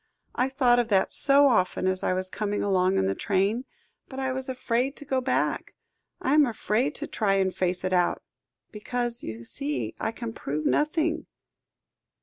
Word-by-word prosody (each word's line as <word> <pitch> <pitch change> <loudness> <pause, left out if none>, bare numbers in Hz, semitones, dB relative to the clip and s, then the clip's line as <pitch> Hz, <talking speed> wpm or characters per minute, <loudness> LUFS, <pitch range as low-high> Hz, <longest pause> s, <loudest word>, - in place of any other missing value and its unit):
"I 255 +2 0
thought 250 -3 +3
of 240 - +1
that 195 -4 +2
so 280 +1 +6
often 185 -7 +1
as 185 0 0
I - - +1
was 185 0 -1
coming 205 -1 -2
along 190 -1 +2
in - - +2
the 95 - +1
train, 200 - 0 0.4
but 265 - -9
I 265 -1 -1
was 265 +1 -4
afraid 255 +1 -1
to 290 - -10
go 265 -2 0
back. 255 0 -1 0.4
I 265 - 0
am 300 -2 +5
afraid 240 +4 -1
to 300 - -4
try 195 -6 +1
to 190 - -1
face 180 0 -2
it 185 0 -1
out, 180 -1 +1 0.5
because 240 +2 -3
you 110 +1 -7
see 285 - -3
I 225 - -1
can 230 0 -6
prove 150 -6 -4
nothing." 315 +2 0
230 Hz, 180 wpm, -26 LUFS, 185-265 Hz, 0.5 s, so